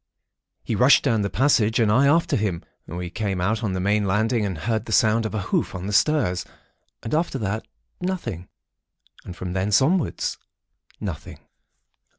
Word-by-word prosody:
"He - - -3
rushed 125 +6 +5
down 115 -6 +2
the 100 - -1
passage, 120 -3 +2
and 110 -3 +3
I 135 +6 +4
after 165 +4 +3
him. 100 -6 -1 0.2
We 90 0 -6
came 100 -2 -2
out 105 +5 0
on 100 -4 -1
the 95 - -2
main 100 +2 +1
landing 110 +2 +1
and 95 -4 -4
heard 110 +7 -2
the 115 - -7
sound 110 +2 +3
of 110 - -6
a 105 - -1
hoof - - 0
on 90 0 -5
the 105 - -3
stairs, 105 - +2 0.6
and 115 - -5
after 155 -3 0
that, 110 -1 -3 0.3
nothing. 170 - -4 0.8
And 90 - -8
from 90 -1 -5
thence, 95 +2 +2
onwards, 160 +4 0 0.6
nothing. - - -6
110 Hz, 170 wpm, -23 LUFS, 95-120 Hz, 0.8 s, rushed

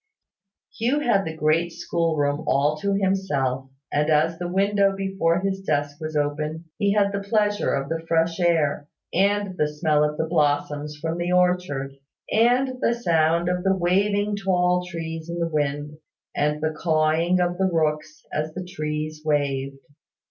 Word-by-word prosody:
Hugh 245 +6 +1
had 200 -8 +2
the 160 -1 -5
great 155 +3 +2
school 170 -1 -1
room 145 +1 0
all 145 +3 +2
to 200 +5 0
himself; 145 -10 0 0.2
and 150 +1 +1
as 160 +2 +2
the 175 - -3
window 195 +2 +2
before 190 -3 0
his 195 0 -2
desk 145 -5 -2
was 155 0 -5
open, 150 +2 -2
he 200 -1 +2
had 200 -1 +2
the 200 - -2
pleasure 205 0 +1
of 140 0 -1
the 165 +1 -3
fresh 165 +1 +1
air, 160 -4 +1 0.3
and 200 +1 +1
the 150 - +3
smell 150 0 +2
of 150 0 -1
the 160 - 0
blossoms 150 -2 0
from 165 +2 -3
the 175 +1 -1
orchard, 180 -7 +1 0.3
and 250 +3 +2
the 235 - +2
sound 170 -5 +2
of 180 0 -1
the 195 0 +3
waving 200 +3 +1
of 205 - -1
the - - -7
tall 180 -1 +2
trees 165 -1 -6
in 170 - -4
the 170 -1 0
wind, 150 -1 -2 0.4
and 150 +1 0
the 155 0 0
cawing 160 +2 +2
of 175 0 0
the 190 0 +2
rooks 155 -1 -1
as 155 +1 -2
the 185 0 -5
trees 155 -3 -4
waved. 140 -3 -1
165 Hz, 170 wpm, -24 LUFS, 150-190 Hz, 0.4 s, the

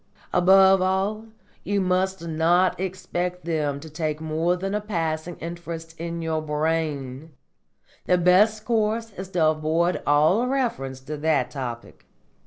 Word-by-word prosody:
Above 190 +1 +6
all, 195 +4 0 0.4
you 205 0 0
must 185 -1 0
not 170 +4 +2
expect 180 -1 -3
them 150 -4 -1
to 160 - -10
take 155 -1 -3
more 160 +2 0
than 195 +2 -4
a 210 - 0
passing 165 -4 -3
interest 165 -1 -7
in 170 0 -4
your 160 -1 -1
brain. 150 -2 -2 0.8
Your 180 - +4
best 205 +5 +4
course 225 0 0
is 190 0 -7
to 175 -4 +1
avoid 160 +3 0
all 155 +11 +4
reference 225 - -2
to 150 +3 -6
that 145 -5 +1
topic. 120 -3 -7
170 Hz, 135 wpm, -24 LUFS, 155-190 Hz, 0.8 s, Above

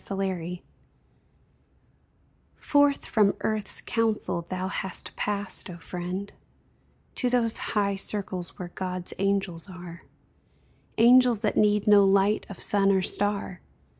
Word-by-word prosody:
QUESTIONINGS 185 -3 -4 1.9
Forth 285 -1 +2
from 210 -4 +2
earth's 215 -1 +1
councils 220 -7 -1
thou 185 0 -3
hast 190 -1 -4
passed, 205 -2 -3
O 175 - -8
friend, 180 +3 -6 0.8
To 250 - -1
those 235 -2 +2 0.2
high 200 -1 +1
circles 195 -3 -2
where 180 -1 -7
God's 185 -1 -4
angels 195 -3 -1
are. 175 -2 -10 1.0
Angels 240 -1 +5
that 215 - -1
need 210 -1 +2
no 205 -1 +6
light 195 +2 +2
of 200 - -9
sun 200 -1 +4
or 190 -1 +2
star 200 -2 0
200 Hz, 115 wpm, -26 LUFS, 185-210 Hz, 1.9 s, no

